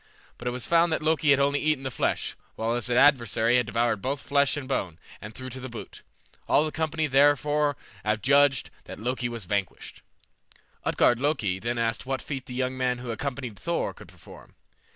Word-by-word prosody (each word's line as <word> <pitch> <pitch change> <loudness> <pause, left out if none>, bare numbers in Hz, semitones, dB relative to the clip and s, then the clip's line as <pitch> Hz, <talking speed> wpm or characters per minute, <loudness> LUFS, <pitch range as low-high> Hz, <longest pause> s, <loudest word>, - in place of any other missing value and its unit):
But 120 - -6
it - - +1
was 125 0 -3
found 170 0 +3
that 160 - -1
Loki 155 -1 +2
had 140 -1 +6
only 140 +1 +2
eaten 155 -3 0
the 130 - -3
flesh, - - -1 0.2
while 115 +1 -1
his 120 0 -1
adversary 120 -3 +4
had 125 -2 +1
devoured 115 -1 0
both 135 +2 -3
flesh 140 0 +2
and 135 -3 -5
bone, 95 - -2 0.2
and 105 - -8
the - - -16
trough 130 +1 -7
to 130 - -6
boot. 110 -4 -9 0.5
All 150 - +4
the 155 - -3
company 160 0 -1
therefore 145 0 +3 0.3
adjudged 130 +6 +3
that - - -9
Loki 120 +2 -2
was 115 -4 -6
vanquished. 100 0 -3 0.8
Utgard 120 - +3
Loki 130 -10 0
then 120 +3 -2
asked 115 +1 -1
what 135 0 -1
feat 135 -3 -5
the 125 - -7
young 130 0 -1
man 125 -1 0
who 125 -1 -5
accompanied 125 -3 -5
Thor 170 0 -2
could - - -14
perform. - - -15
130 Hz, 195 wpm, -26 LUFS, 115-145 Hz, 0.8 s, had